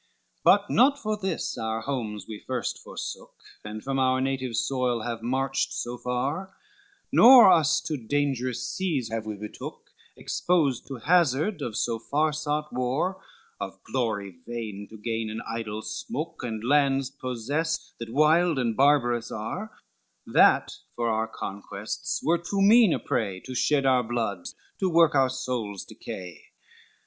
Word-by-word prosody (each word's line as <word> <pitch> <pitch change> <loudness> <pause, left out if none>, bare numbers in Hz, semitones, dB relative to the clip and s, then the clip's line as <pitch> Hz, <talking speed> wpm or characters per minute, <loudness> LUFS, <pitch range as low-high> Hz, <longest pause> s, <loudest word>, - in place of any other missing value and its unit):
XXII - - -42
"But 205 0 +5
not 275 +5 +5
for 215 -3 -1
this 190 -5 -3
our 110 0 -2
homes 110 -6 -4
we 110 -2 -7
first 130 -2 -3
forsook, - - -7 0.3
And 105 0 -7
from 135 0 -1
our 130 0 +3
native 130 -2 -2
soil 125 -1 0
have 115 -1 -4
marched 135 +3 -1
so 120 0 -4
far: 130 +10 -3 0.6
Nor 240 -4 +9
us 160 -5 +4
to 155 - -3
dangerous 130 -1 -1
seas 155 -11 -2
have 110 -1 -4
we 105 - -3
betook, 105 +1 -9 0.3
Exposed 145 -9 0
to 135 - -5
hazard 160 - +2
of 110 -3 -3
so 115 -1 -1
far 150 +6 0
sought 150 0 -2
war, 135 +10 -1 0.4
Of - - -5
glory 105 -8 -2
vain 110 -4 -5
to 110 - -11
gain 115 0 -3
an 110 +1 -5
idle 110 -1 -4
smook, 235 - -5
And 110 -3 -4
lands 135 0 +2
possess 140 +5 -3
that 115 -1 -6
wild 155 +4 +4
and 120 -4 0
barbarous 120 -4 +3
are: 145 - -4 0.6
That - - +4 0.2
for 120 -1 0
our 110 0 0
conquests 100 +1 -5
were 170 +2 +2
too 195 +3 -1
mean 220 -1 +7
a - - +2
prey, 100 -5 -2
To 130 - -8
shed 135 +3 +2
our 130 -2 +4
bloods, 110 -6 -3 0.2
to 190 - +1
work 165 -1 +5
our 135 -2 +4
souls' 125 -6 -4
decay. 90 -4 -9
130 Hz, 155 wpm, -26 LUFS, 115-155 Hz, 0.6 s, Nor